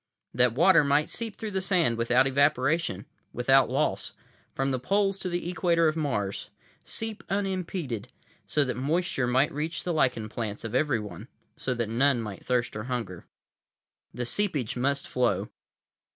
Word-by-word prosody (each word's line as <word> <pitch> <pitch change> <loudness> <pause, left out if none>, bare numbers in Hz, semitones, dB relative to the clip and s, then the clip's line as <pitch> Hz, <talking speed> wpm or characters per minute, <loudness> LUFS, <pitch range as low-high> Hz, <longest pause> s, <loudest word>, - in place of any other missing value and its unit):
That 125 -1 +3
water 170 +2 +6
might 145 +2 +2
seep 225 -3 -4
through 220 -2 -5
the 190 -1 -1
sand 180 -10 +2
without 120 +3 +3
evaporation, 140 - +1 0.3
without 135 +2 +4
loss, - - -1 0.4
from 135 0 -1
the 130 - -1
poles 195 +8 +1
to 185 - -3
the 175 -1 -3
equator 170 -2 +2
of 155 - +1
Mars—seep 150 - -4
unimpeded, 185 - -2 0.4
so 150 - +2
that 130 -2 -2
moisture 145 -1 0
might 130 +4 +2
reach 155 +4 -3
the 175 - -1
lichen 125 -8 +1
plants 110 -1 -5
of 115 -1 -5
everyone, 120 -7 -1 0.3
so 125 - -2
that 115 -2 -1
none 125 +3 +2
might 105 -4 -6
thirst 125 -3 0
or 105 +1 -4
hunger. 115 -9 -4 0.8
The 125 - -4
seepage 145 - 0
must 140 +2 0
flow. 125 -1 0
135 Hz, 150 wpm, -27 LUFS, 120-170 Hz, 0.8 s, water